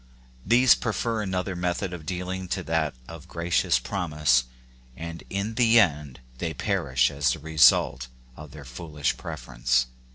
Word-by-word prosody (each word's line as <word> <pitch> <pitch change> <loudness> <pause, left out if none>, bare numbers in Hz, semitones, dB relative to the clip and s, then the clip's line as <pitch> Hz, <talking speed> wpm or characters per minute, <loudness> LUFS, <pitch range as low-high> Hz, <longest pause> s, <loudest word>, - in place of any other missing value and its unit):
These. 120 +1 +6
prefer 115 0 -2
another 95 -1 -2
method 90 +1 -2
of 80 -4 -9
dealing 90 +1 -4
to 95 +1 -3
that 80 -3 -1
of 85 -3 -11
gracious 85 -4 +1
promise, 75 -3 +1 0.5
and 85 0 -7
in 100 +3 -3
the 115 0 +5
end 75 - 0 0.2
they 80 0 -3
per - - -2
ish 65 +2 +3
as 70 -3 +1
the - - -5
result 75 -4 +4 0.3
of 75 +2 -11
their 75 0 -11
foolish 75 +2 -3
preference. 60 +1 -1
80 Hz, 150 wpm, -25 LUFS, 70-95 Hz, 0.5 s, These